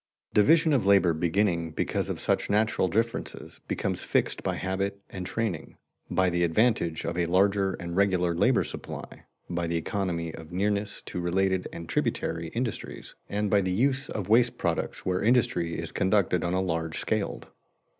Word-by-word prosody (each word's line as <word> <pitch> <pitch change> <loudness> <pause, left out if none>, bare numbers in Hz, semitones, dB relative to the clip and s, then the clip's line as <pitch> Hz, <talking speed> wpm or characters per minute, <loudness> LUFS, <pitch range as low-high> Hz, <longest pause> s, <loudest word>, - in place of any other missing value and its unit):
Division 160 - +5
of 120 -8 +2
labor 95 -4 +5
beginning 85 +1 +1
because - - -1
of - - -3
such - - 0
natural 105 -2 +2
differences, 115 +6 -3
becomes - - -2
fixed - - 0
by - - -1
habit 100 +1 -2
and 90 -2 -5
training, 105 -9 -3 0.3
by 95 -1 +2
the 85 0 +1
advantage 85 -1 +1
of 85 - -2
a 85 - +1
larger 95 +2 +2
and 85 -2 -6
regular 90 -3 +2
labor 85 - +3
supply, - - -8 0.2
by 85 -1 -2
the 85 0 0
economy 85 -2 -2
of 80 0 -10
nearness 100 +2 -1
to - - -5
related 95 +1 +1
and 85 0 -8
tributary 85 0 -1
industries, 115 +6 -5 0.2
and 105 0 -1
by 100 - +5
the 95 - -1
use 130 +7 +1
of 100 -4 -4
waste 120 +3 +4
products - - -2
where 90 -1 0
industry 100 -8 +2
is - - -4
conducted 95 -2 +2
on 90 +1 0
a 95 - +2
large 80 -3 -2
scaled. 110 -2 -2
95 Hz, 165 wpm, -27 LUFS, 85-105 Hz, 0.3 s, Division